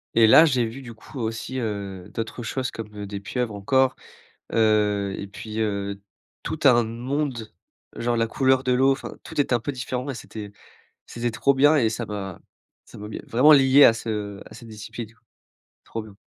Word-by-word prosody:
et 115 -1 +6
là, 155 +9 +8
j'ai 130 -6 +2
vu 130 +5 -8
du 120 -2 -9
coup 130 +5 -11
aussi, 115 +3 -4
heu, 100 -4 -4
d'autres 115 +1 -5
choses 130 +3 -2
comme, 105 -2 -8
heu, 100 -1 -6
des 100 0 -5
pieuvres 110 +2 -3
encore, 130 +6 +2 0.6
heu 105 -3 +2
et 100 - -5
puis, 110 +1 -6
heu, 100 -2 -2 0.4
tout - - -4
un 120 -3 +6
monde, 120 0 -3 0.4
genre 120 0 0
la 115 0 +2
couleur 130 +2 +2
de 125 - +2
l'eau, 130 +2 +4
enfin - - -6
tout - - -3
est 135 - 0
un 120 - +3
peu 145 - -3
différent 125 +1 -4
et - - -4
c'était 105 -2 -8 0.5
c'était 120 0 -3
trop 140 +4 +2
bien 145 +3 +5
et 115 -6 +3
ça 115 0 -4
m'a 100 -3 -6 0.5
ça - - -13
m'a 105 - -7
mis - - -6
vraiment 135 +7 +6
lié 135 0 +7
à - - +8
ce 105 -3 -4
à - - -12
cette 115 - -12
discipline, 110 +1 -8
quoi. 115 - -34 0.6
Trop 115 - -5
bien. 105 -2 -14
115 Hz, 200 wpm, -24 LUFS, 105-130 Hz, 0.6 s, là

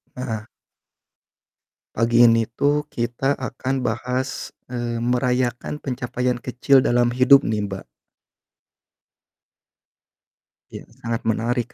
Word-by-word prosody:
Heeh. 110 -4 -4 1.5
Pagi 115 +1 +4
ini 115 -1 +5
tuh 145 +5 0
kita 125 +2 -1
akan 130 0 -3
bahas, 125 +3 -3 0.2
eee, 120 -1 -3
merayakan 125 +1 0
pencapaian 125 -1 -2
kecil 125 +3 +3
dalam 120 -1 +2
hidup 130 +3 +6
nih 105 -2 -1
Mbak. 95 -1 -6 2.9
Ya, - - -9 0.2
sangat 115 -1 -2
menarik 115 +2 -1
120 Hz, 90 wpm, -22 LUFS, 115-130 Hz, 2.9 s, hidup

